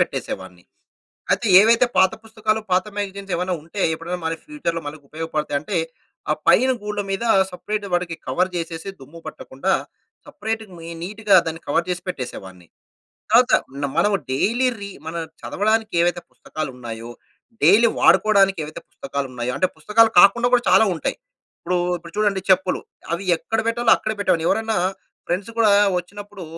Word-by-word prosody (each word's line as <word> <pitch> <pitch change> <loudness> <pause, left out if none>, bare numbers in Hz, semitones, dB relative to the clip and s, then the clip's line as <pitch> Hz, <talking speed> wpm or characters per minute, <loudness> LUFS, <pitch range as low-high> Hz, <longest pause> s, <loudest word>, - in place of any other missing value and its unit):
పెట్టేసేవాడిని. 95 -2 -4 0.7
అయితే 235 - 0
ఏవైతే 230 +4 +5
పాత 190 +1 +5
పుస్తకాలు, 220 -1 -1
పాత 180 0 +3
మాగజైన్స్ 200 -1 -4
ఏమైనా 180 +1 -1
ఉంటే 170 +5 -7
ఎప్పుడైనా 170 +3 -5
మన 160 - -1
ఫ్యూచర్‌లో 170 - -3
మనకు 145 0 -8
ఉపయోగపడతాయి 155 -2 -3
అంటే, 185 +6 -4 0.5
ఆ - - +5 0.2
పైన 260 +3 +5
గూళ్ల 210 0 -3
మీద 195 +4 -2 0.3
సెపరేట్ 205 +3 -4
వాడికి 175 -1 -1
కవర్ 185 +1 +1
చేసేసి, 165 +1 -5
దుమ్ము 145 +5 -13
పట్టకుండా 155 +3 -3 0.6
సెపరేట్‌గా 220 -1 -5
మి 165 0 -9
నీట్‌గా 205 +1 +2
దాన్ని 165 +1 -6
కవర్ 170 +4 +1
చేసి 180 0 -3
పెట్టేసేవాడిని. 95 - -7 0.6
తర్వాత 245 +2 +5 0.3
న 140 - +1
మనం 205 +4 +3 0.2
డైలీ 235 - +1
రీ 200 - -6 0.2
మనం 165 +1 -4 0.2
చదవడానికి 220 +2 0
ఏవైతే 175 0 +1
పుస్తకాలు 155 -3 -6
ఉన్నాయో, 115 -1 -7 0.5
డైలీ 230 +3 +6
వాడుకోవడానికి 195 -3 +4
ఏవైతే 155 - -9
పుస్తకాలున్నాయో, 130 -3 -4
అంటే 185 - +3
పుస్తకాలు 220 +8 +4
కాకుండా 235 +6 +5
కూడా 245 - +2
చాలా 220 - +6
ఉంటాయి. 160 - -3 0.4
ఇప్పుడు 180 +1 -1 0.2
ఇప్పుడు 170 -1 -12
చూడండి 205 -2 +1
చెప్పులు 185 0 +3 0.3
అవి 180 +4 -2
ఎక్కడ 225 +6 -3
పెట్టాలో 230 0 +1
అక్కడే 215 - -3
పెట్టేవాన్ని. 180 -5 +1
ఎవరైనా 220 0 0 0.5
ఫ్రెండ్స్ 190 +5 -2
కూడా 225 -2 +5 0.3
వచ్చినప్పుడు 205 +1 -9
185 Hz, 145 wpm, -21 LUFS, 165-215 Hz, 0.7 s, డైలీ